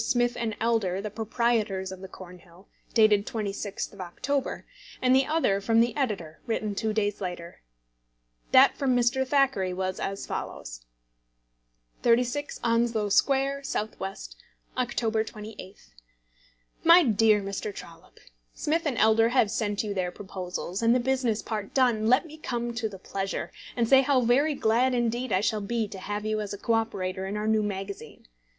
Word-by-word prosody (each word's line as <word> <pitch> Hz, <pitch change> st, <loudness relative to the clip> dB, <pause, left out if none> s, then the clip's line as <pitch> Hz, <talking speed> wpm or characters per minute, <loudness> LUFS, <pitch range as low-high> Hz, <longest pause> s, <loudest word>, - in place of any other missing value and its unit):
Smith 240 Hz, -1 st, +1 dB, 0.2 s
& 210 Hz, -, -10 dB
Elder, 220 Hz, -5 st, +1 dB
the 210 Hz, +1 st, -5 dB
proprietors 220 Hz, -3 st, -1 dB
of 190 Hz, -, -8 dB
the 190 Hz, -, -7 dB
Cornhill, 180 Hz, 0 st, -14 dB, 0.3 s
dated 215 Hz, -3 st, +4 dB
26th 205 Hz, -2 st, -4 dB
of 200 Hz, -, -9 dB
October, 270 Hz, +10 st, -3 dB, 0.3 s
and 255 Hz, 0 st, +4 dB
the 265 Hz, 0 st, +3 dB
other 255 Hz, -12 st, +1 dB
from 225 Hz, +3 st, +3 dB
the 235 Hz, +1 st, +2 dB
editor, 200 Hz, -, -3 dB
written 215 Hz, -2 st, -1 dB
two 220 Hz, +2 st, -1 dB
days 210 Hz, -1 st, -1 dB
later. 175 Hz, -2 st, -6 dB, 0.9 s
That 265 Hz, +1 st, +7 dB
from 265 Hz, -3 st, +1 dB
Mr. 245 Hz, +2 st, +2 dB
Thackeray 265 Hz, -10 st, +2 dB
was 185 Hz, 0 st, -3 dB
as 195 Hz, 0 st, -3 dB
follows: -, -, -6 dB, 1.2 s
36 245 Hz, +5 st, +1 dB
Onslow 230 Hz, -2 st, +1 dB
Square, 275 Hz, +6 st, +2 dB
S.W., 210 Hz, -7 st, -4 dB, 0.6 s
October 230 Hz, -3 st, 0 dB
28th. 210 Hz, -, -10 dB, 0.9 s
MY 335 Hz, +2 st, +8 dB
DEAR 220 Hz, -3 st, +4 dB
MR. 200 Hz, +1 st, -4 dB
TROLLOPE, 165 Hz, -1 st, -13 dB, 0.3 s
Smith 325 Hz, +3 st, 0 dB
& -, -, -17 dB
Elder 220 Hz, +1 st, +4 dB
have 235 Hz, -4 st, +2 dB
sent 210 Hz, -2 st, -1 dB
you 210 Hz, -2 st, -3 dB
their 185 Hz, -2 st, -2 dB
proposals; 185 Hz, 0 st, -5 dB
and 230 Hz, +1 st, +4 dB
the -, -, +3 dB
business 250 Hz, -3 st, 0 dB
part 210 Hz, -3 st, -5 dB
done, 240 Hz, -5 st, +3 dB
let 255 Hz, +7 st, +4 dB
me 310 Hz, -1 st, -11 dB
come 240 Hz, -4 st, -3 dB
to 230 Hz, -2 st, -2 dB
the 195 Hz, -, -9 dB
pleasure, 195 Hz, +1 st, -4 dB, 0.3 s
and 235 Hz, -1 st, +2 dB
say 270 Hz, +2 st, +7 dB
how 270 Hz, -1 st, +3 dB
very 275 Hz, +6 st, +3 dB
glad 250 Hz, +2 st, +2 dB
indeed 240 Hz, +1 st, -1 dB
I 185 Hz, -, +2 dB
shall 210 Hz, 0 st, 0 dB
be 225 Hz, +1 st, -1 dB
to 195 Hz, -, -8 dB
have 205 Hz, +2 st, -4 dB
you 215 Hz, 0 st, 0 dB
as 205 Hz, -1 st, -4 dB
a -, -, -10 dB
co 230 Hz, -, 0 dB
operator 190 Hz, -4 st, -1 dB
in 205 Hz, +2 st, -3 dB
our 210 Hz, -, -2 dB
new 220 Hz, 0 st, +3 dB
magazine. 200 Hz, -1 st, -6 dB
220 Hz, 165 wpm, -27 LUFS, 195-245 Hz, 1.2 s, MY